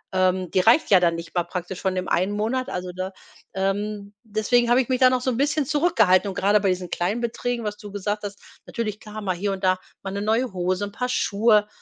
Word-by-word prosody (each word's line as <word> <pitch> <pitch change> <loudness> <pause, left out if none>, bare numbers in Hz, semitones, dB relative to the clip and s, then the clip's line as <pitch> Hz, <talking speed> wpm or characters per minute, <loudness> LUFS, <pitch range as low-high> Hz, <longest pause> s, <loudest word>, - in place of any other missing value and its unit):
ähm, 185 -1 +1
die 185 - +2
reicht 230 - +4
ja 185 - +8
dann 170 -1 +2
nicht 165 0 -8
mal 175 - +3
praktisch 180 +1 -6
von 190 -1 0
dem 185 0 -2
ein 185 +3 +1
Monat, 225 +5 -1
also, 180 0 -4
ne? 185 +1 -4 0.4
Ähm, 200 +1 -2
deswegen 225 +3 +1
habe 245 +2 +5
ich 245 - -5
mich 255 0 +1
da 255 -1 +7
noch 255 -1 0
so 255 - 0
n' 235 - -3
bisschen 290 +1 +1
zurückgehalten. 225 - +3
Und 190 - -6
grade 205 +2 +3
bei 195 -1 +1
diesen 180 -1 -2
kleinen 195 +7 -1
Beträgen 235 0 -2
was 210 0 -3
du 205 -2 -10
gesagt 205 +1 -3
hast 200 0 -6 0.3
natürlich, 215 -3 -4
klar, 215 0 -8
mal 185 -3 -1
hier 200 +3 -2
und 190 0 -7
da 185 0 +3 0.2
mal 195 - -4
'ne 200 - -3
neue 225 +1 0
Hose, 185 +2 -1
'n 200 - -8
Paar 250 +2 -3
Schuhe. 210 -2 +3
205 Hz, 245 wpm, -24 LUFS, 185-230 Hz, 0.4 s, ja